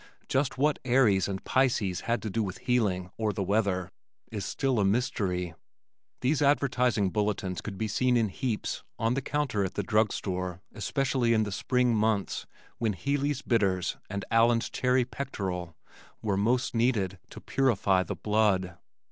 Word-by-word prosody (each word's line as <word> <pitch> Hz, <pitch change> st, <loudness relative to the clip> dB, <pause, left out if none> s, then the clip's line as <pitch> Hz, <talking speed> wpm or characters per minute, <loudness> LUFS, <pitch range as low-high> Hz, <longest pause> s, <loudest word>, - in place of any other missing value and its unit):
Just 135 Hz, 0 st, 0 dB
what 145 Hz, +2 st, +2 dB
"Aries" 120 Hz, -7 st, +3 dB
and 95 Hz, -1 st, -4 dB
"Pisces" 110 Hz, -8 st, +1 dB
had 115 Hz, -2 st, -1 dB
to 110 Hz, -, -2 dB
do 115 Hz, -, 0 dB
with 95 Hz, -3 st, -3 dB
healing 95 Hz, -6 st, 0 dB
or 110 Hz, -1 st, 0 dB
the 100 Hz, 0 st, -2 dB
weather 100 Hz, -2 st, 0 dB, 0.4 s
is 105 Hz, -3 st, -4 dB
still 135 Hz, -4 st, 0 dB
a -, -, +3 dB
mystery. 95 Hz, -5 st, 0 dB, 0.7 s
These 140 Hz, +4 st, +1 dB
advertising 125 Hz, -8 st, +2 dB
bulletins 100 Hz, -3 st, -1 dB
could 100 Hz, -3 st, -6 dB
be 110 Hz, -, -1 dB
seen 125 Hz, +4 st, +2 dB
in 110 Hz, -3 st, +2 dB
heaps 110 Hz, +2 st, -3 dB
on 115 Hz, +2 st, +1 dB
the 135 Hz, -, -1 dB
counter 135 Hz, -7 st, -1 dB
at 95 Hz, -, -3 dB
the 100 Hz, -, -1 dB
drug 105 Hz, +2 st, +2 dB
store 90 Hz, -2 st, -3 dB
especially 130 Hz, 0 st, +1 dB
in 110 Hz, -, +3 dB
the 100 Hz, -, -4 dB
spring 125 Hz, +4 st, +1 dB
months 110 Hz, -2 st, 0 dB, 0.3 s
when 110 Hz, -3 st, +1 dB
"Healey's 140 Hz, -, -1 dB
Bitters" 95 Hz, -6 st, +1 dB
and 100 Hz, 0 st, -4 dB
"Allen's 115 Hz, 0 st, +3 dB
Cherry 125 Hz, 0 st, +2 dB
Pectoral" 95 Hz, -, -4 dB, 0.4 s
were 105 Hz, -3 st, -1 dB
most 120 Hz, +6 st, +1 dB
needed 110 Hz, -6 st, +1 dB
to -, -, -10 dB
"purify 105 Hz, -8 st, +2 dB
the 90 Hz, -, -4 dB
blood." 100 Hz, -4 st, +1 dB
110 Hz, 160 wpm, -28 LUFS, 95-125 Hz, 0.7 s, Aries